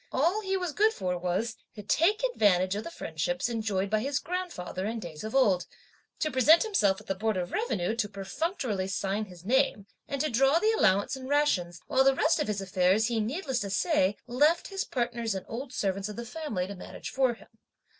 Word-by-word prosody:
All 340 +10 +2
he 385 -2 -1
was 360 -3 -2
good 435 +5 +3
for 180 -1 -2
was: 180 +6 -2 0.2
to 210 - -8
take 380 - +2
advantage 185 - +3
of 210 +2 -3
the - - -6
friendships 175 - -2
enjoyed 215 -5 -1
by 215 - +3
his 270 +4 -1
grandfather 335 - -4
in 230 +2 -3
days 165 -6 -8
of 220 +3 -5
old, 200 -9 +3 0.5
to 310 - -1
present 285 +6 +6
himself 205 - +2
at - - -15
the - - -1
Board 215 +1 -1
of 180 -1 -3
Revenue 220 - -1
to 210 -3 0
perfunctorily 205 - -3
sign 195 +2 -1
his 180 -3 -14
name 255 -4 +2 0.2
and 280 -1 -3
to 310 - 0
draw 270 +6 +4
the 430 +6 +3
allowance 205 - +2
and 260 0 -8
rations; 185 - +1
while 265 -2 +3
the 270 0 +4
rest 310 +4 +2
of 300 - 0
his 205 -2 -2
affairs 190 +3 +2
he, 235 -2 0
needless 265 - -1
to 200 - -3
say, 205 - +2
left 295 +8 +2
his 390 -1 -2
partners 235 -3 -2
and 190 - -5
old 250 +3 -6
servants 195 -3 -2
of 210 - -7
the 235 - -6
family 245 - -3
to 200 - -6
manage 185 - -8
for 260 -3 +2
him. - - -20
225 Hz, 210 wpm, -29 LUFS, 195-290 Hz, 0.5 s, present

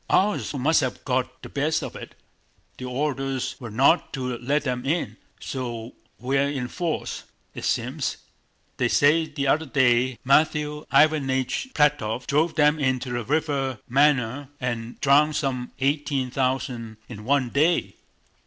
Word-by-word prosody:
"Ours 205 +2 +2
must 150 +5 +3
have 130 -2 -4
got 130 -1 -2
the - - -7
best 155 +3 0
of - - -6
it. - - -9 0.6
The 130 - -5
orders 135 0 -2
were 120 - -7
not 135 +10 +3
to 125 -2 -3
let 140 +5 0
them 125 -3 -2
in. 160 +6 -1 0.2
So 120 -3 -5 0.2
we're 135 +2 +1
in 130 -4 -3
force, 170 0 -3 0.3
it - - -6
seems.... - - -1 0.6
They - - +2
say 160 +3 +3
the 145 -2 -3
other 155 +3 +2
day 125 -2 +2
Matthew 150 +2 +2
Iványch 140 - +2
Plátov 125 -6 +1
drove 155 +3 +1
them 150 0 +4
into 130 -2 0
the 120 -1 -2
river 140 -1 -1
Márina 135 -1 +2
and 120 -2 -4
drowned 145 +2 +4
some 130 -4 -2
eighteen 140 -2 0
thousand 130 -4 -2
in 105 -3 -9
one 135 +1 +1
day." 160 +4 +2
135 Hz, 145 wpm, -24 LUFS, 125-150 Hz, 0.6 s, them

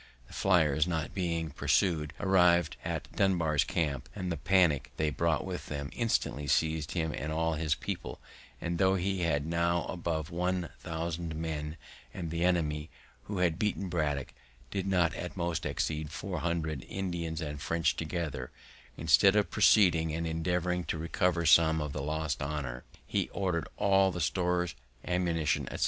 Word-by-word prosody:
The - - -16
flyers, 80 -5 +3
not 80 -4 -2
being 85 -4 -1
pursu'd, 80 -1 +1
arriv'd 90 -4 +4
at - - -3
Dunbar's 85 -7 +2
camp, 75 -5 -2
and 90 -3 -3
the - - 0
panick 80 -6 +3
they 75 -1 +1
brought 85 -1 0
with 90 -2 -5
them 70 -1 -4
instantly 105 -10 0
seiz'd 80 +1 +1
him 80 -3 -1
and 75 - -4
all 80 +1 +1
his 80 -1 0
people; - - -5 0.4
and, 85 0 -3
tho' 95 0 +4
he 95 +1 -1
had 75 -4 +1
now 85 +1 +1
above 85 -3 -3
one 90 0 -1
thousand 85 -1 -4
men, 80 -1 -4 0.4
and 85 -3 -4
the 85 0 -1
enemy 80 -3 +1 0.4
who 100 - -4
had 85 -3 +1
beaten 100 -3 -1
Braddock 75 -5 -1 0.4
did 95 -1 -2
not 90 -4 +2
at 90 +3 -6
most 85 -1 -1
exceed 75 -1 -2
four 90 +2 -4
hundred 80 -4 -2
Indians 85 -4 -3
and 75 -3 -5
French 80 +1 +1
together, 80 -6 -3 0.5
instead 85 +5 +5
of 105 -1 +2
proceeding, 85 -6 +5
and 85 0 -2
endeavouring 90 +2 0
to - - -2
recover 85 +1 0
some 80 0 +6
of 75 -2 -3
the 75 - -3
lost 80 +1 -2
honour, 70 -4 -4 0.2
he - - -1
ordered 90 -5 -1
all 95 -1 +4
the 90 - -5
stores, 90 +1 0 0.3
ammunition, 85 -4 0
etc. - - -6
85 Hz, 160 wpm, -31 LUFS, 75-90 Hz, 0.5 s, some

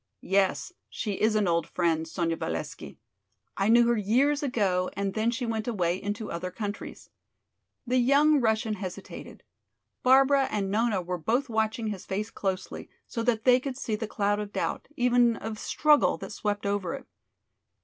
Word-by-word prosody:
"Yes, 195 - +1 0.2
she 210 -3 -3
is 215 0 +3
an 210 -2 +2
old 170 -2 +1
friend, 165 -2 0
Sonya 165 0 -1
Valesky. - - -5 0.6
I 195 +2 +1
knew 235 +1 +6
her 240 - +3
years 255 +8 +2
ago 195 -9 0
and 200 -1 -2
then 220 +2 +1
she 245 +1 -2
went 225 -1 -3
away 185 -5 0
into 205 +2 -4
other 180 +2 -4
countries." 205 +1 -7 0.7
The 255 +1 +2
young 285 +3 +4
Russian 220 -1 +1
hesitated. 190 -3 -8 0.6
Barbara 270 +2 +5
and 195 -2 -2
Nona 215 -3 +1
were 180 0 -4
both 240 - 0
watching 220 0 -1
his 200 -3 -6
face 210 +3 -3
closely, 190 -1 -4 0.2
so 230 - -4
that 230 -2 0
they 250 -1 +6
could 260 -1 -5
see 225 -5 -2
the 220 +1 -4
cloud 205 -1 0
of 205 -1 -5
doubt, - - -3
even 245 -1 +3
of 220 -1 -6
struggle, 300 -1 +3
that - - -8
swept 205 -1 -3
over 200 +4 -1
it. 270 -2 -10
215 Hz, 170 wpm, -27 LUFS, 195-245 Hz, 0.7 s, knew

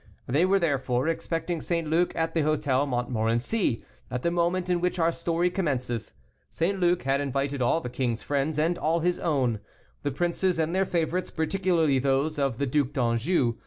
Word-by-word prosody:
They 145 +8 +2
were, 195 +1 +4
therefore, 135 -6 0
expecting 165 0 -2
St. 170 -2 -1
Luc 170 +3 +2
at 165 0 -1
the 165 - +1
Hôtel 145 -2 +1
Montmorency, 120 - 0 0.2
at 125 0 -4
the 170 - +2
moment 175 +1 0
in 175 -1 +1
which 180 +1 0
our 165 -1 +3
story 170 +1 0
commences. 130 - -2 0.3
St. 190 +4 -1
Luc 175 0 +2
had 135 +1 +1
invited 140 0 -1
all 125 +7 +2
the - - -5
king's 125 -2 -2
friends 145 +2 -1
and 165 +3 +1
all 165 +2 +1
his 180 +1 +1
own; 130 -9 +1 0.4
the 145 - -1
princes 175 +4 0
and 160 +1 0
their 190 0 +1
favorites, 175 +2 -1
particularly 165 -4 +1
those 140 +3 +1
of 135 -5 0
the 140 - 0
Duc 140 +1 0
d'Anjou. 120 0 +1
155 Hz, 180 wpm, -27 LUFS, 135-175 Hz, 0.4 s, were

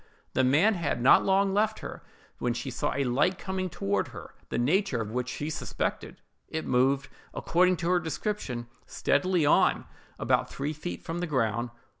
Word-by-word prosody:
The 130 - +2
man 155 +12 +4
had 170 -9 -1
not 125 +3 +6
long 195 0 +3
left 215 +2 +1
her, - - -7 0.4
when 120 -1 0
she 125 +2 -4
saw 125 - -1
a 140 - +1
light 145 +9 +1
coming 190 -1 -3
toward 100 - -1
her, - - -10 0.2
the - - -2
nature 150 - +1
of 110 -2 -4
which 125 +1 -2
she 150 +4 -4
suspected. - - -4 0.3
It 160 0 -4
moved, 135 +2 +2 0.3
according 180 +1 +2
to 170 0 -2
her 180 - +4
description, 160 - -3 0.2
steadily 175 +2 +1
on, - - +3 0.3
about - - +1
three 145 +3 -3
feet 155 +4 -6
from 165 +1 -4
the 175 - -2
ground. 120 -4 0
150 Hz, 175 wpm, -28 LUFS, 125-185 Hz, 0.4 s, not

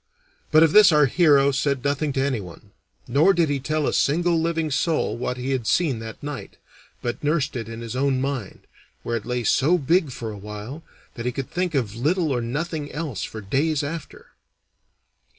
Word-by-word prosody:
But 155 0 +7
of 160 - +4
this 210 -3 +8
our 150 -1 +5
hero 140 -1 +4
said 140 -1 -1
nothing 145 +1 0
to 135 - 0
anyone, 105 -6 -5 0.4
nor 155 +10 +4
did 170 -3 +2
he 140 -1 0
tell 155 +3 -1
a - - 0
single 170 +4 +2
living 165 -2 -1
soul 160 +3 0
what 125 +1 -3
he 125 +2 -3
had 125 -4 -1
seen 150 -10 +1
that 115 +3 -9
night, 145 -2 -7 0.5
but 120 +3 -3
nursed 145 -2 0
it 115 -3 -4
in 115 0 -7
his 115 +1 -6
own 135 0 +1
mind, 135 -6 -4 0.4
where 120 - -2
it 110 - -8
lay 125 -1 -1
so 145 +10 +3
big 165 +1 +2
for 120 -3 -5
a 105 - -8
while 105 +8 -8 0.3
that 120 -1 -5
he - - +1
could 135 +1 -5
think 180 -3 -1
of 115 -6 -1
little 155 +6 +1
or 125 -2 0
nothing 145 +5 -3
else 145 - -4
for 110 - -6
days 140 +9 0
after. 160 +2 -7
140 Hz, 195 wpm, -23 LUFS, 120-155 Hz, 0.5 s, this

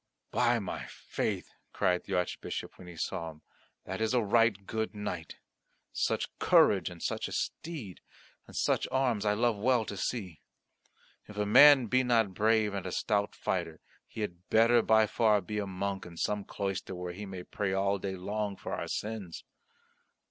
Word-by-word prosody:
"By 120 0 +3
my 100 -5 -5
faith," - - -4 0.2
cried 90 0 +1
the - - -2
Archbishop 90 -1 -3
when 90 - -11
he 90 - -10
saw 85 0 -3
him, 75 -1 -14 0.4
"that 95 +3 -5
is 110 +3 +1
a 125 - +4
right 105 -2 +3
good 110 +1 -3
knight! 105 0 -5 0.6
Such - - 0
courage, 95 -4 +4
and 85 -2 -10
such - - -2
a - - -9
steed, 140 - -4 0.5
and - - -13
such - - +1
arms 125 -6 +1
I 105 - +4
love 115 0 +1
well 120 0 +2
to 100 - -5
see. 95 - -4 0.9
If 105 - -11
a 105 - +1
man 140 +4 +8
be 130 +4 +2
not 115 -5 +2
brave 110 +1 +2
and 95 -2 -4
a - - -4
stout 105 +1 0
fighter, - - -2 0.3
he 110 - -7
had 90 -2 -6
better 115 +2 +5
by 110 0 +4
far 110 -1 +3
be 105 +3 -4
a 100 - -3
monk 95 0 -3
in 85 -1 -12
some 105 +2 -1
cloister 95 -1 -4
where 90 0 -5
he 100 +3 -7
may 95 -2 -7
pray 100 +1 -2
all 100 +1 +1
day 95 0 -3
long 100 +2 -3
for - - -6
our - - -3
sins." 105 -6 -5
105 Hz, 180 wpm, -30 LUFS, 95-110 Hz, 0.9 s, man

